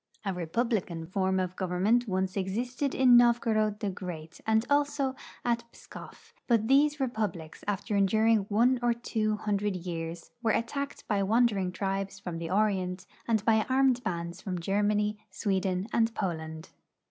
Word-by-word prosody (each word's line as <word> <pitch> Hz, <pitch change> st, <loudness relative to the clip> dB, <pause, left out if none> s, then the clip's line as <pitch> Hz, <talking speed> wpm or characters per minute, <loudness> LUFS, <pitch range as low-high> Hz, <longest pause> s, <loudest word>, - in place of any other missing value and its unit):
A 195 Hz, -, 0 dB
republican 180 Hz, -1 st, -2 dB
form 190 Hz, +1 st, 0 dB
of 185 Hz, 0 st, -2 dB
government 195 Hz, +7 st, +1 dB
once 190 Hz, -1 st, -1 dB
e.xisted 240 Hz, +8 st, -2 dB
in 255 Hz, -2 st, +6 dB
Novgorod 225 Hz, -3 st, +3 dB
the 205 Hz, -2 st, -1 dB
Great, 175 Hz, -4 st, -8 dB
and 220 Hz, +1 st, +3 dB
also 285 Hz, -2 st, +1 dB, 0.3 s
at 235 Hz, -1 st, +1 dB
Pskoff, 455 Hz, +1 st, -13 dB
but 230 Hz, -3 st, +2 dB
these 290 Hz, +3 st, +4 dB
republics, 215 Hz, -, -3 dB
after 205 Hz, +1 st, -1 dB
enduring 215 Hz, +1 st, +3 dB
one 240 Hz, +5 st, +3 dB
or 240 Hz, -1 st, +3 dB
Uvo 215 Hz, -2 st, -1 dB
hundi*ed 205 Hz, -1 st, 0 dB
years, 170 Hz, -1 st, -5 dB
were 230 Hz, -, +1 dB
attacked 280 Hz, +4 st, -3 dB
by 205 Hz, -2 st, +1 dB
wandering 205 Hz, -3 st, +2 dB
triljes 195 Hz, +1 st, -3 dB
from 175 Hz, -4 st, -5 dB
the 165 Hz, -1 st, -4 dB
Orient 185 Hz, -2 st, 0 dB, 0.2 s
and 220 Hz, -3 st, +1 dB
by 220 Hz, -1 st, +4 dB
armed 260 Hz, -1 st, +3 dB
bands 170 Hz, -1 st, -4 dB
from 185 Hz, -3 st, -3 dB
Germany, 210 Hz, +3 st, 0 dB
Sweden 190 Hz, -2 st, -1 dB
and 230 Hz, 0 st, +3 dB
Poland. 160 Hz, -4 st, -4 dB
205 Hz, 145 wpm, -29 LUFS, 185-235 Hz, 0.3 s, in